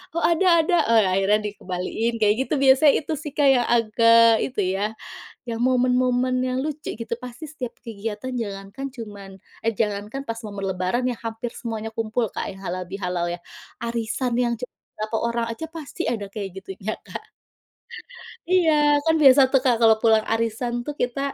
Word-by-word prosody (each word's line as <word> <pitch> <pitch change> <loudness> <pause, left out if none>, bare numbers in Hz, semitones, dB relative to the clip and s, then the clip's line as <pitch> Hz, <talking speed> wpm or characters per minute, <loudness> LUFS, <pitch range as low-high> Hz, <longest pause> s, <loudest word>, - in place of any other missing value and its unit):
"Oh 335 - -1
ada 340 +3 +3 0.2
ada." 350 +2 +2
Nah 220 -5 +4
akhirnya 200 +2 +3
dikembaliin 200 +6 -3
kayak 210 0 +4
gitu - - -2
biasa, 275 +2 +6
itu 315 - -1
sih 295 -1 -7
Kak 290 -2 +3
yang 245 -3 +4
agak 230 0 +5
itu 245 -5 -2 0.2
ya, 210 +2 -1 0.6
yang 230 0 -3
momen-momen 255 0 +2
yang 255 0 -1
lucu 305 0 -4
gitu. 230 0 -3
Pasti 250 +4 -9
setiap 260 -6 -6
kegiatan 225 +2 -6
jangankan 200 +2 -5
cuman 205 -5 -9 0.3
eh 225 - +2
jangankan 210 +5 -2
pas 230 - -3
momen 200 -1 -6
lebaran 185 +8 -1
ya 245 - -2
hampir 225 +1 -4
semuanya 225 -2 -5
kumpul 225 +1 -1
Kak - - -4
ya 195 - -13
halalbihalal 180 -1 -3
ya. - - -7 0.5
Arisan 235 +1 -2
yang 240 -1 +1
cuma 250 - -7 0.2
beberapa 215 +1 -3
orang 235 0 -1
aja 320 +8 -6
pasti 315 -6 -6
ada 210 -4 -3
kayak 200 -2 -5
gitunya 195 +3 -5
Kak. - - -9 1.2
Iya, 355 -3 +4 0.3
kan 320 - +4
biasa 275 -1 +8
tuh 270 - +5
Kak 245 - +4
kalau 225 -1 +7
pulang 220 -1 +4
arisan 230 +1 -1
tuh 295 - -4
kita, 245 +2 -1
230 Hz, 170 wpm, -23 LUFS, 210-255 Hz, 1.2 s, biasa